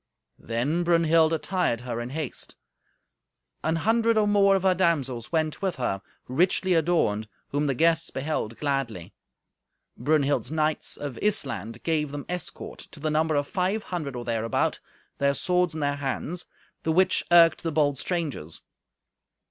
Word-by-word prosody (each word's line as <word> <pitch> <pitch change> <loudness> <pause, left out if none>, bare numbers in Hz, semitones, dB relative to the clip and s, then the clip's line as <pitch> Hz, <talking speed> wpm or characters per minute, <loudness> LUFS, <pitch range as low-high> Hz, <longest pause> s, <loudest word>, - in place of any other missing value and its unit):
Then 130 +10 -1
Brunhild 165 -1 +4
attired 165 -6 0
her 120 -1 -4
in 120 - -5
haste. 150 -1 -5 1.1
An 160 +1 +1
hundred 225 +5 +2
or 210 -1 +3
more 200 -1 +5
of 190 - 0
her 190 -1 +4
damsels 140 -10 0
went 155 -2 0
with 190 -2 -1
her, 110 -6 -2 0.3
richly 180 +7 +2
adorned, 160 -11 +1 0.2
whom 145 +1 0
the 135 - 0
guests 165 +3 +2
beheld 130 -5 -3
gladly. 135 - -2 0.8
Brunhild's 145 0 +1
knights 155 -1 0
of 140 -5 -6
Issland 115 - -1
gave 155 -3 0
them 145 -1 -6
escort, 180 0 -6
to - - -11
the 155 +1 -1
number 155 0 +1
of 145 0 0
five 190 +4 -1
hundred 155 -7 -4
or 120 -1 -5
thereabout, 115 -1 0 0.4
their 140 0 +2
swords 180 -1 +1
in 155 - -3
their 145 0 0
hands, 145 +5 -3 0.3
the 160 - 0
which 185 +3 +3
irked 170 -1 +6
the 165 - -2
bold 145 -3 +1
strangers. 155 - -3
155 Hz, 150 wpm, -26 LUFS, 135-175 Hz, 1.1 s, irked